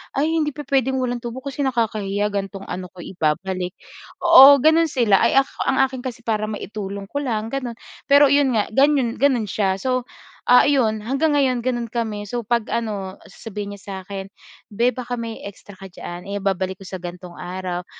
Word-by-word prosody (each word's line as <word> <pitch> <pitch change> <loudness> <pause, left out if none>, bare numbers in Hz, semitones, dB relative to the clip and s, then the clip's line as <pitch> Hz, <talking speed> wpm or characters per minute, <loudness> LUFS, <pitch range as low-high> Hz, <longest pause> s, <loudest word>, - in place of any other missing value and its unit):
"Ay, 295 +4 +1
hindi 300 -3 -1
pupuwedeng 270 -3 0
walang 245 -1 -1
tubo 240 +2 -7
kasi 280 +1 -3
nakakahiya 210 -4 -1
ganitong 195 -1 -4
ano 180 0 -5
ko 175 - -11
ibabalik." 180 +2 -2 0.5
oo, 285 -5 +10
gano'n 320 +2 +4
sila, 230 -8 +3
ay - - +2
ak 270 - -1 0.2
ang 265 - +2
akin 265 -1 -2
kasi 240 -3 -6
para 215 -2 -1
maitulong 200 -2 -6
ko - - -3
lang 220 -4 -2
gano'n. 255 -4 -3 0.3
Pero 285 +1 +7
iyon 280 -3 +3
nga 210 - +2
ganyun 270 -1 +3
gano'n 260 -4 +2
siya. 190 -1 0
So 255 0 -1 0.4
ah, 250 - +7
iyon 235 -7 +2
hanggang 275 +5 +1
ngayon, 255 -3 +2
gano'n 240 -2 -1
kami. 220 -3 -3
So 240 +2 -2
'pag 235 0 0
ano 205 -5 -3
sasabihin 205 0 -7
niya - - -19
sa 200 - -8
akin, 195 -1 -6 0.5
"Be, 235 +4 +3
baka 250 -1 -6
may 230 -1 -5
extra 200 0 -11
ka 195 - -11
diyan, 175 0 -8
eh 200 0 -3
babalik 190 -1 -2
ko - - -10
sa 185 - -5
ganitong 175 0 -9
araw." 180 0 -5
225 Hz, 185 wpm, -21 LUFS, 195-260 Hz, 0.5 s, oo